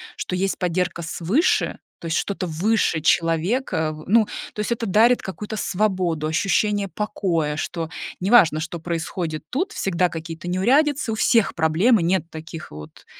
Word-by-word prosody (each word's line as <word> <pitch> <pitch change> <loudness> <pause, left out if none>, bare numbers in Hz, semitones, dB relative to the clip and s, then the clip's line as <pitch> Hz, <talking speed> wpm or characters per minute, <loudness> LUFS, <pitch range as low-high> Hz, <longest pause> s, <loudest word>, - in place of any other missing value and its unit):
что 180 - -4
есть 195 +1 -1
поддержка 180 -1 -1
свыше, 185 - +1 0.2
то - - -11
есть 160 - 0
что-то 195 -2 -2
выше 175 +1 +1
человека, 165 - +1
а, - - -3
в 155 0 -11
ну, 225 0 +5 0.3
то - - -10
есть 210 - -2
это 230 0 -4
дарит 230 +6 +4
какую-то 210 +3 -6
свободу, 180 -7 0
ощущение 200 +4 +1
покоя, 180 -8 -1
что 165 +1 -4 0.3
неважно, 180 -6 +5
что 165 +2 -5
происходит 165 -1 -4
тут, 365 - -1
всегда 180 -1 0
какие-то 165 +1 -7
неурядицы, 265 +7 +2
у - - -1
всех 220 -1 +2
проблемы, 170 +7 +3
нет 175 -1 0
таких 160 0 -9
вот 75 0 -11
180 Hz, 155 wpm, -22 LUFS, 165-215 Hz, 0.3 s, ну